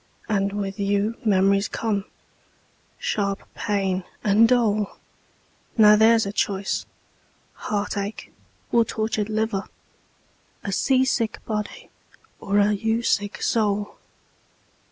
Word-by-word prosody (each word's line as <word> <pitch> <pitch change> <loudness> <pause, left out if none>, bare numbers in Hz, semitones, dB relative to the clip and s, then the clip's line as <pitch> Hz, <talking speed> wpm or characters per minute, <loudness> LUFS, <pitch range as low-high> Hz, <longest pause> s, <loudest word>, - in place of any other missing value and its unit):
And 200 -2 0
with 200 -1 -4
you 200 +2 +1
memories 195 -1 +3
come, 205 -3 -2 0.9
sharp 200 -1 -2
pain, 195 -3 -1 0.2
and 215 +3 +5
dole. 215 -5 +1 0.8
Now 210 -1 +8
there's 225 +1 +5
a 200 - -3
choice 195 -1 -1 0.7
heartache 205 0 -4 0.4
or 235 - +5
tortured 220 -1 -2
liver! 220 -2 -1 1.0
A 200 - -3
sea 260 +6 +2
sick 230 -4 0
body, 210 -1 -5 0.5
or 200 +1 -1
a 205 0 +4
you 225 +3 0
sick 205 -3 0
soul! 210 -2 0
205 Hz, 105 wpm, -24 LUFS, 200-220 Hz, 1.0 s, Now